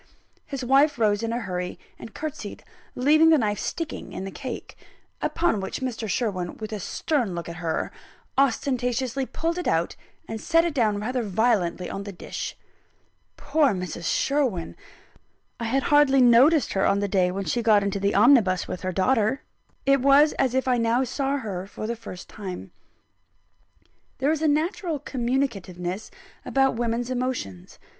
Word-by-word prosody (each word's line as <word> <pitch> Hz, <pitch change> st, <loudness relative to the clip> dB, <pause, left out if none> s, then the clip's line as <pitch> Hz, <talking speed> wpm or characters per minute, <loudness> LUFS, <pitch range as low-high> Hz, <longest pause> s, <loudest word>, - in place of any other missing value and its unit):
His 270 Hz, -3 st, -4 dB
wife 275 Hz, +3 st, +4 dB
rose 210 Hz, -3 st, +2 dB
in 230 Hz, 0 st, -2 dB
a 235 Hz, -, -1 dB
hurry, 180 Hz, -3 st, -4 dB, 0.2 s
and 225 Hz, -, -10 dB
curtseyed, 310 Hz, -1 st, -6 dB, 0.3 s
leaving 310 Hz, +5 st, +5 dB
the 320 Hz, -, +6 dB
knife 210 Hz, -5 st, 0 dB
sticking 330 Hz, -2 st, -5 dB
in -, -, -5 dB
the 195 Hz, -, -5 dB
cake; 255 Hz, +3 st, -7 dB, 0.5 s
upon 330 Hz, -11 st, +1 dB
which 190 Hz, -, -4 dB
Mr. 235 Hz, -4 st, -3 dB
Sherwin, 190 Hz, -5 st, -2 dB
with 215 Hz, 0 st, -6 dB
a 210 Hz, -, -3 dB
stern 235 Hz, -, -1 dB
look 170 Hz, -, -5 dB
at 170 Hz, 0 st, -7 dB
her, 165 Hz, -2 st, -2 dB, 0.4 s
ostentatiously 255 Hz, -1 st, 0 dB
pulled 335 Hz, +2 st, -2 dB
it 360 Hz, -, -3 dB
out, -, -, +1 dB, 0.3 s
and 220 Hz, -1 st, -5 dB
set 330 Hz, 0 st, +3 dB
it 340 Hz, -, -1 dB
down 215 Hz, -7 st, +1 dB
rather 250 Hz, +4 st, -1 dB
violently 200 Hz, -4 st, +1 dB
on 195 Hz, -, -5 dB
the 200 Hz, 0 st, -6 dB
dish. 180 Hz, -, -6 dB, 0.8 s
Poor 290 Hz, -4 st, +2 dB
Mrs. 180 Hz, -2 st, -5 dB
Sherwin! 255 Hz, -, 0 dB, 0.8 s
I 230 Hz, -, -3 dB
had 265 Hz, +4 st, +1 dB
hardly 290 Hz, -2 st, +5 dB
noticed 255 Hz, +5 st, +5 dB
her 195 Hz, -, +1 dB
on 200 Hz, -, +3 dB
the 205 Hz, -, 0 dB
day 185 Hz, -2 st, +2 dB
when 195 Hz, +2 st, -3 dB
she 240 Hz, -, 0 dB
got 215 Hz, -3 st, +4 dB
into 200 Hz, 0 st, -1 dB
the 200 Hz, +1 st, 0 dB
omnibus 210 Hz, -4 st, +5 dB
with 180 Hz, -, -5 dB
her 185 Hz, -, -2 dB
daughter 220 Hz, +6 st, +1 dB, 0.4 s
it 275 Hz, -1 st, +4 dB
was 280 Hz, +3 st, +6 dB
as 260 Hz, -2 st, +2 dB
if 260 Hz, 0 st, +1 dB
I 250 Hz, -1 st, +3 dB
now 230 Hz, +3 st, +2 dB
saw 270 Hz, +2 st, -1 dB
her 195 Hz, -7 st, -5 dB
for 215 Hz, -, -7 dB
the 235 Hz, +2 st, -2 dB
first 215 Hz, -5 st, -9 dB
time. 190 Hz, -4 st, -7 dB, 1.5 s
There 275 Hz, +3 st, +1 dB
is 315 Hz, -1 st, -1 dB
a 320 Hz, -, +3 dB
natural 320 Hz, +3 st, 0 dB
communicativeness 220 Hz, -9 st, -2 dB, 0.3 s
about 270 Hz, 0 st, +2 dB
women's 235 Hz, +1 st, -1 dB
emotions. 245 Hz, -, -4 dB
235 Hz, 165 wpm, -25 LUFS, 200-275 Hz, 1.5 s, the